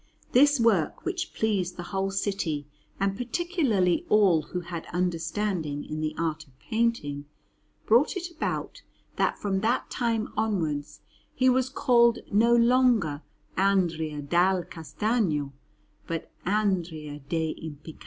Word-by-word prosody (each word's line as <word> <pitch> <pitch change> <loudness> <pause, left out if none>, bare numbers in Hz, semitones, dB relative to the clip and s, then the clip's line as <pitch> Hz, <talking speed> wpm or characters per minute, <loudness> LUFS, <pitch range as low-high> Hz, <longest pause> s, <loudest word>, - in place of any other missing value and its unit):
This 285 +2 +5
work, 205 -10 +2
which 365 -1 -2
pleased 195 -5 0
the 175 - -5
whole 195 0 0
city 190 -7 -2 0.3
and 195 0 +1
particularly 245 - 0
all 195 -7 +5
who 180 +3 -5
had 170 -1 -7
understanding 170 -3 -2
in 155 0 -5
the 155 0 -2
art 160 -1 -2
of 130 -1 -26
painting, 190 -10 -1 0.6
brought 245 - +4
it 350 -1 -5
about 335 - -4 0.4
that - - +1
from 195 -2 -1
that 225 +5 0
time 230 -3 -1
onwards 160 -9 -2 0.3
he 255 0 +4
was 255 0 +2
called 235 -3 +4
no 230 +4 +4
longer 235 - +3 0.3
Andrea 165 -6 +1
dal 175 +4 +2
Castagno 165 - -1 0.5
but 165 -1 -4 0.2
Andrea 175 -8 -1
degl' 160 -2 -2
Impiccati. 155 0 -9
190 Hz, 125 wpm, -27 LUFS, 160-230 Hz, 0.6 s, This